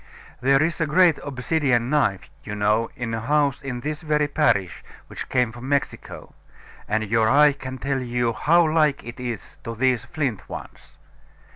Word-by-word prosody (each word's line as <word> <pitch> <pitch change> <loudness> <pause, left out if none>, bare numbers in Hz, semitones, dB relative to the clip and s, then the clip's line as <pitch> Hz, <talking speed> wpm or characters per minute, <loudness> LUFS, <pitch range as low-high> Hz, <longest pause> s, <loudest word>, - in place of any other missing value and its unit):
There 135 +3 +4
is 165 +1 -2
a 160 - +1
great 170 0 +4
obsidian 130 -2 0
knife, 120 -11 +1 0.2
you 105 - -6
know, 105 +2 +1
in 120 -4 -4
a 115 - -1
house 140 +2 +1
in 130 -3 -5
this 150 +3 -4
very 150 -2 +1
parish, 115 - 0 0.2
which - - -8
came 125 -3 +1
from 120 +3 -8
Mexico; 140 -1 -3 0.5
and 110 +1 0
your 110 +1 +2
eye 145 +2 +6
can 130 -2 -7
tell 135 +1 -2
you 120 -1 -1
how 170 +7 +3
like 155 -3 +2
it 120 +2 -9
is 120 -5 -6
to 115 - -5
these 125 -1 +1
flint 145 - -3
ones. - - -10
130 Hz, 170 wpm, -23 LUFS, 115-150 Hz, 0.5 s, eye